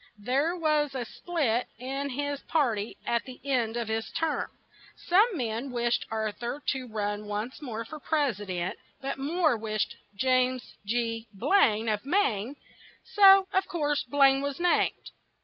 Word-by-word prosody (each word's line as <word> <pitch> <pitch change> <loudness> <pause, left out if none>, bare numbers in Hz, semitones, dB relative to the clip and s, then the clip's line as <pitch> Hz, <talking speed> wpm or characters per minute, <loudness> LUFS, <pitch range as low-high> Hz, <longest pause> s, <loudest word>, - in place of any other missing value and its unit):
There 270 - 0
was 305 -4 +1
a 250 -2 -2
split 255 -5 -1
in 270 +3 -3
his 285 +1 -3
par 285 -8 +2
ty 205 +2 -5
at 235 -1 +1
the 255 -1 -10
end 240 -4 0
of 235 -2 -2
his 220 0 -2
term; 325 -1 -1 0.5
some 400 +3 +3
men 235 +1 -2
wished 240 -1 0
Ar 220 -1 -1
thur 240 +6 -5
to 260 -2 -2
run 210 -1 -3
once 210 +7 -4
more 230 -5 -5
for 305 +6 -8
pres 285 -9 0
i - - -6
dent, 180 -1 -3 0.2
but 275 0 -4
more 310 0 +2
wished 215 -1 -2 0.2
James 255 +2 +1
G. 230 0 -1
Blaine 220 - +3
of 210 -2 0
Maine; 270 - +1 0.6
so, 390 -1 +8
of 380 0 +2
course, 295 -4 0
Blaine 270 +1 +4
was 280 +1 -3
named. 350 0 +1
255 Hz, 160 wpm, -28 LUFS, 225-295 Hz, 0.6 s, so